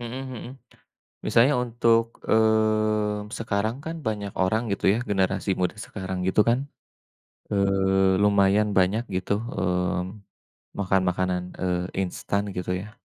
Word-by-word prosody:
Mhm, 120 +2 -5
mhm. 125 -2 -7 0.8
Misalnya 130 +5 +4
untuk, 115 -1 +1
mmm, 110 -1 +2
sekarang 110 +1 -1
kan 165 +1 -4
banyak 105 -2 -2
orang 110 +5 +2
gitu 100 - -4
ya? 110 - 0
Generasi 95 0 0
muda 90 +3 0
sekarang 95 -2 -5
itu 100 - +3
kan, 120 +1 +4 0.9
eee, 95 -1 +2
lumayan 100 +1 +4
banyak 100 +6 +2
gitu, 90 +2 -2
hmm, 90 -3 -2 0.6
makan 95 -1 +2
makanan, 90 0 0 0.2
eee, 90 -1 0 0.2
instan 95 +2 -2
gitu 90 0 -3
ya. 105 +3 -11
100 Hz, 125 wpm, -25 LUFS, 95-110 Hz, 0.9 s, Misalnya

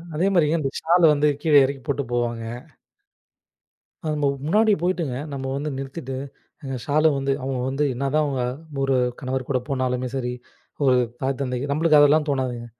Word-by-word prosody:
அதே 175 +5 +2
மாரி 165 -4 +4
அந்த 135 -2 -1
சால் 170 +1 +4
வந்து 150 0 +2
கீழே 150 -4 +6
இறக்கி 135 0 -4
போட்டுப் 140 -3 -2
போவாங்க. 120 -1 -1 1.6
அது 155 -1 -1
நம்ம 145 - +2 0.2
முன்னாடி 215 +6 +3
போயிட்டுங்க 175 -7 -1 0.2
நம்ம 135 -1 -4
வந்து 145 +2 -3
நிறுத்திட்டு 135 0 -6 0.5
ஏங்க 135 -1 -4
சால் 155 +2 +3
வந்து 135 0 -1
அவங்க 130 -1 -2
வந்து 140 +2 -1
என்னதான் 140 +4 0
அவங்க 135 -3 -2 0.4
ஒரு 135 -1 +2 0.2
கணவர் 130 -1 -3
கூடப் 125 -2 -2
போனாலுமே 130 -1 -1
சரி, 125 -2 -2 0.5
ஒரு 130 -1 +5 0.3
தாய் 135 0 -1
தந்தை 125 -2 -2
நம்மளுக்கு 155 0 +4
அதெல்லாம் 150 +1 +4
தோணாதுங்க. 130 -4 -2
135 Hz, 160 wpm, -23 LUFS, 130-150 Hz, 1.6 s, கீழே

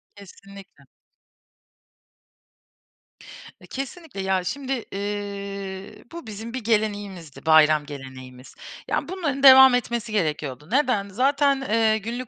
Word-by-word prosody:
Kesinlikle. 200 0 -15 2.8
E, - - -17
kesinlikle. 275 - -7
Ya, 190 -1 0
şimdi, 270 +5 -4 0.2
ııı, 200 0 -6
bu 335 -8 -9
bizim 220 +3 -8
bir 255 -3 -5
geleneğimizdi, 205 -8 -3
bayram 155 -1 +5
geleneğimiz. 130 -2 -11 0.3
Yani, - - -2
bunların 290 -7 -3
devam 265 -1 +9
etmesi 235 -2 -3
gerekiyordu. 150 - -2
Neden? 250 -8 +1
Zaten, 275 +5 +1
eee, 220 0 +2
günlük 235 +3 -6
205 Hz, 105 wpm, -23 LUFS, 190-255 Hz, 2.8 s, devam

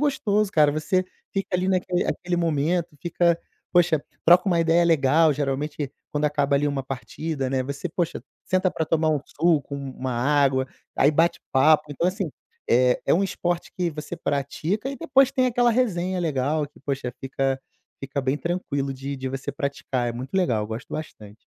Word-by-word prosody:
gostoso 215 -8 +1
cara, 150 -2 +4
você 185 +5 0 0.3
fica 195 0 -2
ali 185 +1 +1
naquele 180 -1 +1
aquele 175 0 -2
momento, 165 0 0
fica 170 -1 +2 0.3
poxa, 170 -4 +4 0.2
troca 175 +3 +6
uma 170 -2 +3
ideia 165 +1 +4
legal, 160 0 +4
geralmente, 145 0 -2 0.2
quando 150 0 0
acaba 145 -1 +1
ali 145 +1 +1
uma 140 -1 -2
partida, 135 +2 -4
né, 130 -1 +1
você, 140 +6 -4
poxa, 165 -6 -2 0.2
senta 185 0 +1
pra 160 - -2
tomar 160 0 +2
um 150 - +2
suco, 155 -3 +1
uma 130 -2 -4
água, 135 +1 +2 0.3
aí 145 - +5
bate 165 +3 +2
papo. 150 +3 +5
Então, 165 +5 0
assim, 185 -4 -3 0.4
é 125 +1 +4
é - - +4
um 195 +4 +2
esporte 175 -2 -2
que 180 -1 0
você 150 0 -6
pratica 160 - -2
e 275 - -6
depois 275 -5 +3
tem 255 -2 +2
aquela 245 0 +3
resenha 190 -7 0
legal 150 -1 0
que, 145 - -21
poxa, 135 -3 -3
fica 135 0 -1 0.4
fica 135 +1 -3
bem 135 +2 0
tranquilo 145 -6 -2
de 135 +1 -5
de 130 - -5
você 135 +2 -4
praticar, 140 -3 -2
é 120 - -2
muito 130 +7 -7
legal, 125 - +2
eu 105 - -9
gosto 110 +1 -6
bastante. 110 -9 -7
150 Hz, 180 wpm, -24 LUFS, 135-175 Hz, 0.4 s, troca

